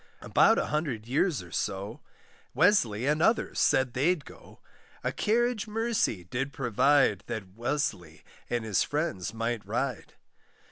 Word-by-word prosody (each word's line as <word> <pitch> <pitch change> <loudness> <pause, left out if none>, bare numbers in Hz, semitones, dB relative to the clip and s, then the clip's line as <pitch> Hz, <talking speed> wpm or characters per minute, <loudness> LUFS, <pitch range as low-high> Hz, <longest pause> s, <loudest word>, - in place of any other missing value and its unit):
About - - +4
a - - +1
hundred 140 -8 -2
years 140 - 0
or 85 - -14
so, 100 0 -3 0.5
Wesley 125 - +3
and 150 +2 +1
others 220 +6 +2
said 130 -2 +2
they'd 150 +3 +1
go: - - -15 0.4
A - - 0
carriage 230 0 0
mercy 220 - -1
did 125 +10 -3
provide, 135 +3 +2
That 105 -6 -6
Wesley 110 - -3 0.3
and 120 -2 -1
his 105 -3 +1
friends 145 - -2
might 115 -1 -3
ride. 120 +4 -3
125 Hz, 135 wpm, -28 LUFS, 110-155 Hz, 0.5 s, About